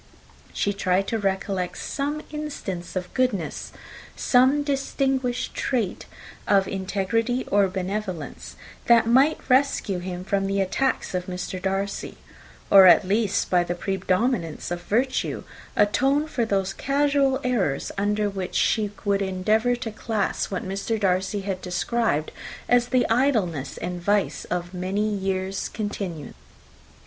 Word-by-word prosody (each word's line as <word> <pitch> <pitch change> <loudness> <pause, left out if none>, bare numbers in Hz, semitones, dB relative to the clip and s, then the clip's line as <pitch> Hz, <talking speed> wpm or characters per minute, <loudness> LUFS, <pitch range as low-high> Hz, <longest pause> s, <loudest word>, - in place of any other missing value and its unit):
She 205 - 0
tried 195 -1 +1
to 225 - -1
recollect 195 -2 -1
some 290 +2 -3
instance 280 - -5
of 180 -1 -4
goodness, 235 -11 -1 0.4
some 265 +3 +4
distinguished 270 -3 -1
trait 230 -8 -2 0.4
of 195 -2 +4
integrity 215 +6 -1
or 200 -1 +4
benevolence, 185 -3 -4 0.3
that 235 -1 +6
might 265 +7 +3
rescue 255 -8 +2
him 180 0 -5
from 195 +1 0
the 195 0 0
attacks 230 +7 0
of 180 0 -2
Mr. 180 0 -5
Darcy; 195 +1 -2 0.5
or 195 -1 +10
at 185 - +6
least, 205 0 +1
by 180 -1 +4
the 175 0 -3
predominance 190 -1 -1
of 175 0 -3
virtue, 250 +8 0 0.3
atone 270 +8 +3
for 250 -7 -1
those 195 -3 0
casual 280 0 +2
errors, 200 - 0
under 210 +1 +1
which 195 -2 -4
she 215 -2 +2 0.2
would 200 0 +2
endeavour 215 +6 +1
to 240 -2 -5
class 215 -1 -2
what 185 -1 -4
Mr. 200 +4 -2
Darcy 190 +1 0
had 190 -1 -4
described 180 -3 -1 0.4
as 245 0 +4
the 250 -1 +2
idleness 220 - +1
and 180 0 -4
vice 205 +2 0
of 175 0 -3
many 190 +4 -1
years' 190 -1 -2
continuance. 195 - -5
200 Hz, 130 wpm, -24 LUFS, 185-245 Hz, 0.5 s, or